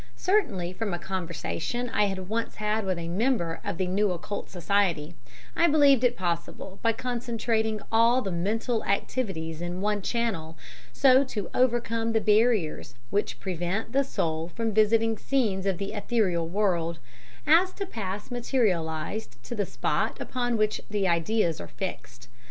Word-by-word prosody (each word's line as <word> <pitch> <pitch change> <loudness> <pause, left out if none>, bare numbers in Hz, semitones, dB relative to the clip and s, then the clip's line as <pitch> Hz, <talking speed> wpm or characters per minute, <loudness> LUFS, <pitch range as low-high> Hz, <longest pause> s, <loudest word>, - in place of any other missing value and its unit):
Certainly, 195 - +1
from 205 -2 -2
a - - -3
conversation 185 +6 -3
I 210 - +3
had 190 -2 -3
once 225 +3 -2
had 215 0 -1
with 185 -2 0
a 170 -1 -4
member 180 -3 0
of 200 -4 -3
the 185 - 0
New 200 +3 +1
Occult 180 +3 -4
Society, 175 -4 0 0.4
I 340 - +4
believed 285 -5 +5
it 245 -1 +3
possible 180 +2 -3
by 230 - +3
concentrating 225 -2 -1
all 230 +3 +4
the 195 - -3
mental 220 +7 -1
activities 190 -6 -2
in 175 +1 -3
one 210 +1 0
channel, 190 -9 -2 0.3
so 265 0 +5
to 210 -7 -5
overcome 230 -2 +1
the 225 - +4
barriers 215 - +2 0.2
which 205 - -1
prevent 185 +4 -2
the 275 +2 +3
soul 165 -9 -2
visiting 225 0 +2
scenes 210 -8 0
of 190 -3 +1
the 200 +3 -4
ethereal 205 -6 0
world, 170 -3 0 0.5
as 335 +5 +5
to 395 - -4
pass 205 - -5
materialized 200 - -1
to - - -6
the 205 -5 -1
spot - - -1
upon 245 -2 -1
which 215 0 +1
the 205 -2 0
ideas 170 0 +1
are - - -7
fixed. 120 -11 -7
205 Hz, 150 wpm, -27 LUFS, 175-230 Hz, 0.5 s, believed